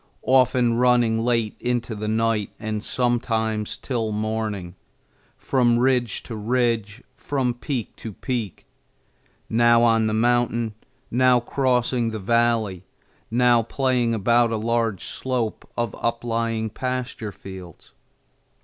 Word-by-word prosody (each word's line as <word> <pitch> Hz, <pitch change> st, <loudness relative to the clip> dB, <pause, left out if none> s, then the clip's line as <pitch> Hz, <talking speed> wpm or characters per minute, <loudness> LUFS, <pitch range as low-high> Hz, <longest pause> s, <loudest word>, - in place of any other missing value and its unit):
often 125 Hz, -2 st, +4 dB
running 120 Hz, -2 st, +3 dB
late 115 Hz, -2 st, 0 dB
into 120 Hz, -1 st, -1 dB
the 105 Hz, 0 st, -4 dB
night 110 Hz, -1 st, 0 dB
and 110 Hz, -1 st, -3 dB
sometimes 110 Hz, -4 st, -1 dB
till 115 Hz, -5 st, -2 dB
morning, 105 Hz, -4 st, -3 dB, 0.6 s
from 120 Hz, -3 st, +2 dB
ridge 125 Hz, -3 st, +1 dB
to 115 Hz, -, -7 dB
ridge, 115 Hz, 0 st, -1 dB
from 130 Hz, -4 st, -1 dB
peak 120 Hz, 0 st, -4 dB
to 110 Hz, -, -7 dB
peak; 115 Hz, -2 st, -4 dB, 0.8 s
now 120 Hz, +1 st, +4 dB
on 115 Hz, -1 st, +3 dB
the -, -, 0 dB
mountain, 120 Hz, -1 st, +1 dB, 0.4 s
now 125 Hz, 0 st, +4 dB
crossing 125 Hz, -1 st, 0 dB
the 110 Hz, -, -4 dB
valley, 110 Hz, -3 st, +1 dB, 0.5 s
now 120 Hz, 0 st, +4 dB
playing 125 Hz, -1 st, 0 dB
about 115 Hz, +3 st, +3 dB
a 115 Hz, -, -1 dB
large 115 Hz, -2 st, -1 dB
slope 125 Hz, -4 st, -3 dB
of 120 Hz, -3 st, -1 dB
uplying 115 Hz, -1 st, -1 dB
pasture 125 Hz, -2 st, -4 dB
fields. 95 Hz, -3 st, -11 dB
115 Hz, 115 wpm, -23 LUFS, 110-120 Hz, 0.8 s, often